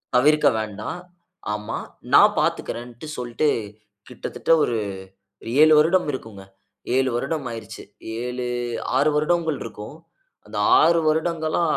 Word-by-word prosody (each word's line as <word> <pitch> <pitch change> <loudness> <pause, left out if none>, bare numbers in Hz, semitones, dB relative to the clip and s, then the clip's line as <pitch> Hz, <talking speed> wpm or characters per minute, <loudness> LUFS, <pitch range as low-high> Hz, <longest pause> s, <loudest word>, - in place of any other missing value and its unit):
தவிர்க்க 150 +4 +4
வேண்டா 105 -1 -5 0.6
ஆமா. 105 +1 -4 0.4
நான் - - +7
பார்த்துக்கிறேன்ட்டு 120 +4 -3
சொல்ட்டு, 125 +5 -1 0.6
கிட்டத்தட்ட 125 +5 -4
ஒரு 120 - 0 0.9
7 155 0 +7
வருடம் 170 +4 +3
இருக்குங்க. 110 -7 -8 0.5
7 130 0 +2
வருடம் 135 +4 -2
ஆயிருச்சு. 110 -2 -8 0.4
7 125 0 -4 0.5
6 145 +3 +3
வருடங்கள் 160 0 +1
இருக்கும். 115 +5 -9 0.5
அந்த - - -8 0.2
6 170 +1 +4
வருடங்களா, 160 +1 0
135 Hz, 105 wpm, -23 LUFS, 115-155 Hz, 0.9 s, நான்